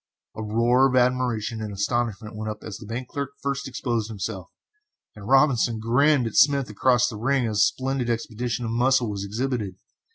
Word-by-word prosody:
A - - -5
roar 120 +5 +3
of 130 - -1
admiration 125 -3 +1
and 105 -1 -4
astonishment 110 +1 -2
went 110 0 -4
up 105 0 -7
as 105 -3 -7
the 105 - -11
bank 125 +3 -5
clerk 140 -1 -4
first 140 -1 -3
exposed 120 -4 -2
himself, 95 -4 -5 0.7
and 105 -1 -10
Robinson 130 -4 +3
grinned 130 +4 +3
at 115 - -4
Smith 140 -5 +4
across 125 +3 +3
the 115 - -5
ring 130 +3 +1
as 110 -2 -2
the 105 - +4
splendid 130 -2 -2
exhibition 120 +1 -2
of 115 - -3
muscle 125 -1 +2
was 100 -1 -4
exhibited. 110 -2 -3
120 Hz, 185 wpm, -24 LUFS, 110-130 Hz, 0.7 s, Smith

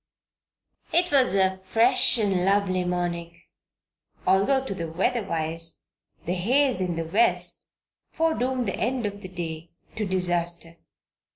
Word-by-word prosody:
It 345 +1 +2
was 260 -8 +3
a 190 -1 +1
fresh 235 +2 +5
and 195 -5 +1
lovely 195 -1 +1
morning, 175 -1 -3 0.9
although 260 +8 +3
to 230 - -2
the 165 -4 -5
weather 230 +8 0
wise 165 -2 -4 0.4
the 175 - -1
haze 250 +5 +1
in 180 -2 -1
the 165 0 -3
West 200 +9 +1 0.4
foredoomed 260 -6 0
the - - -1
end 245 +1 -1
of 205 0 -5
the 185 - -7
day 165 -2 -6 0.3
to 210 -2 -1
disaster. 175 -2 -2
190 Hz, 130 wpm, -25 LUFS, 170-235 Hz, 0.9 s, fresh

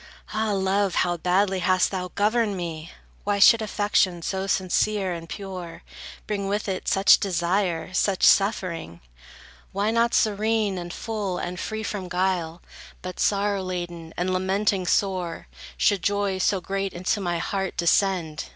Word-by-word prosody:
Ah, 215 0 0
Love, 195 0 +1
how 175 -1 +2
badly 185 +3 +1
hast 185 +1 +2
thou 185 -2 -3
governed 210 0 +1
me! 165 -2 -5 0.3
Why 205 0 0
should 225 +3 +7
affection 205 -5 +1
so 190 +2 -2
sincere 190 +1 +1
and 165 -1 -8
pure, 185 -4 -7 0.4
Bring 200 -2 -2
with 205 +2 -2
it 190 -2 -3
such 195 +1 +5
desire, 180 -1 -1
such 190 0 +1
suffering? 180 - +2 0.7
Why 200 +3 0
not 230 +1 +2
serene, 215 -2 +1
and 175 0 -6
full, 205 -3 -3
and 180 0 -4
free 220 +2 -4
from 195 -4 -4
guile 180 -2 -1 0.4
But 185 0 -7
sorrow 200 -1 +1
laden, 175 -3 -5
and 185 +1 0
lamenting 190 0 0
sore, 185 -4 0 0.3
Should 195 - +2
joy 200 0 0
so 190 +1 +2
great 195 +1 -3
into 185 +4 -1
my 175 -2 -1
heart 190 +2 -3
descend? 170 -2 +1
190 Hz, 145 wpm, -24 LUFS, 180-205 Hz, 0.7 s, should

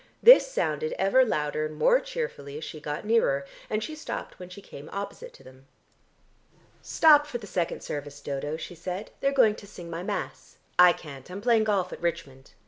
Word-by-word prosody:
This - - +8
sounded 465 -1 -1
ever 260 +7 +4
louder 155 -8 -1
and 155 - -10
more - - +4
cheerfully 460 - -5
as 155 - -7
she 155 - -7
got 150 +5 -5
nearer, 175 -12 +2 0.2
and 215 0 -1
she 310 - -5
stopped 310 - -7
when 180 -1 -9
she 185 - -10
came 150 -6 -11
opposite 200 - -6
to - - -17
them. 130 +1 -17 1.1
"Stop 295 -2 +5
for 250 - -4
the 225 - -10
second 175 -4 -2
service, 145 0 -6
Dodo," 145 +2 -4
she 170 - -8
said. 180 +4 -6
"They're 275 - +1
going 240 -6 +4
to 210 -1 -12
sing 175 -4 -10
my 165 +1 -4
mass. 180 - -5 0.2
I 180 0 +9
can't. 140 -5 -9
I'm 185 +2 -6
playing 225 0 +3
golf 200 -4 0
at - - -9
Richmond. 165 -6 -4
180 Hz, 195 wpm, -27 LUFS, 150-230 Hz, 1.1 s, I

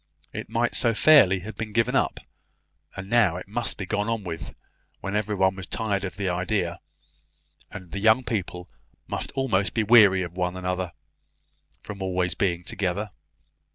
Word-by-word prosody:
It - - -6
might - - 0
so 115 -2 +2
fairly 110 -11 +6
have 110 +4 -8
been 110 -2 -6
given 115 0 +1
up! - - +1 0.8
and 95 0 -7
now 105 -6 +3
it 90 - -8
must 115 +4 -2
be 100 - -4
gone 105 +3 -1
on 115 -2 -2
with, 85 -1 -6 0.4
when 95 +1 -4
every 105 0 -1
one 95 0 +2
was 95 -1 -7
tired 105 -3 -2
of 95 -2 -4
the 100 -1 -2
idea, 90 0 -1 0.9
and 95 -3 -10
the 95 - -4
young 110 +5 +4
people 90 -6 -4 0.4
must - - -4
almost 115 -8 0
be 115 - +2
weary 105 -4 +6
of 85 -1 -7
one 90 0 -2
another, 90 -1 -3 0.9
from 100 -2 -8
being 95 - -3
always 90 -2 0
together! 95 +2 -2
95 Hz, 170 wpm, -25 LUFS, 90-110 Hz, 0.9 s, fairly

